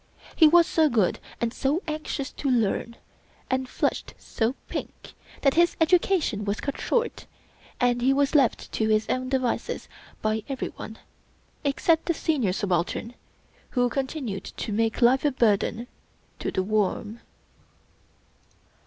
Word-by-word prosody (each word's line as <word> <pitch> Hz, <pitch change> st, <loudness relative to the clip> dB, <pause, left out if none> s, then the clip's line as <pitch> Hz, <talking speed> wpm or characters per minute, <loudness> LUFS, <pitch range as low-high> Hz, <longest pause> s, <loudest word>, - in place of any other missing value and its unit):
He 320 Hz, -, +7 dB
was 340 Hz, +2 st, +6 dB
so 315 Hz, -2 st, +3 dB
good 215 Hz, -8 st, +1 dB, 0.2 s
and 235 Hz, 0 st, -1 dB
so 285 Hz, +8 st, 0 dB
anxious 305 Hz, -2 st, -3 dB
to 280 Hz, -, -3 dB
learn, 235 Hz, -1 st, 0 dB, 0.6 s
and 260 Hz, 0 st, 0 dB
flushed -, -, -2 dB
so 230 Hz, +2 st, -2 dB
pink, -, -, -7 dB, 0.3 s
that 275 Hz, -2 st, +4 dB
his 345 Hz, +1 st, +3 dB
education 325 Hz, -, +2 dB
was 200 Hz, +1 st, -2 dB
cut 280 Hz, -, -4 dB
short, 475 Hz, -1 st, -1 dB, 0.5 s
and 245 Hz, 0 st, +2 dB
he 260 Hz, +2 st, +4 dB
was 280 Hz, 0 st, +2 dB
left 275 Hz, -7 st, +2 dB
to 220 Hz, -1 st, 0 dB
his 215 Hz, 0 st, +2 dB
own 255 Hz, 0 st, -1 dB
devices 255 Hz, -3 st, -1 dB, 0.4 s
by 215 Hz, 0 st, +1 dB
every 270 Hz, -1 st, -3 dB
one 220 Hz, -, -9 dB, 0.7 s
except 315 Hz, +3 st, +2 dB
the 340 Hz, -, +1 dB
Senior 275 Hz, -, +1 dB
Subaltern 185 Hz, +4 st, -1 dB, 0.6 s
who 245 Hz, 0 st, +4 dB
continued 260 Hz, -7 st, -3 dB
to -, -, -6 dB
make 225 Hz, +2 st, +1 dB
life 255 Hz, +3 st, +5 dB
a 295 Hz, -, +4 dB
burden 230 Hz, -1 st, +1 dB, 0.5 s
to -, -, -2 dB
The 190 Hz, -, -1 dB
Worm. 215 Hz, +2 st, -1 dB
250 Hz, 140 wpm, -26 LUFS, 220-290 Hz, 0.7 s, He